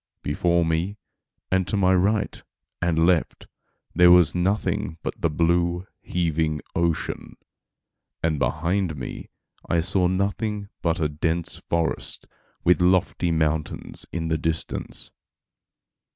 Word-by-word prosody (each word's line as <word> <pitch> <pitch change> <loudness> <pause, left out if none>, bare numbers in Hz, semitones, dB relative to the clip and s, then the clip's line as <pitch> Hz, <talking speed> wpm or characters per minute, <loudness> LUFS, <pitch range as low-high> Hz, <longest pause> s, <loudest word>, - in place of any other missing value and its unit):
Before 85 +3 +2
me, 85 +6 -1 0.5
and 95 -1 +2
to 105 - 0
my 95 -1 +4
right 100 +3 +1 0.4
and 85 -2 +2
left, 85 -2 +1 0.5
there 90 0 +6
was 90 -2 +6
nothing 90 -2 0
but - - -2
the 85 - +2
blue, 85 +3 +1 0.2
heaving 80 -3 0 0.2
ocean; 85 -2 -1 0.9
and 80 -3 +1
behind 85 +3 0
me, 65 -4 -7 0.4
I 85 - +3
saw 90 +2 +2
nothing 100 +2 -1
but 85 +1 0
a 80 - +2
dense 80 +3 -2
forest, 85 -1 -1 0.4
with 90 0 +4
lofty 90 0 +2
mountains 80 -2 -1
in 80 -1 -2
the 80 -1 0
distance. 80 +1 -2
85 Hz, 120 wpm, -24 LUFS, 80-90 Hz, 0.9 s, there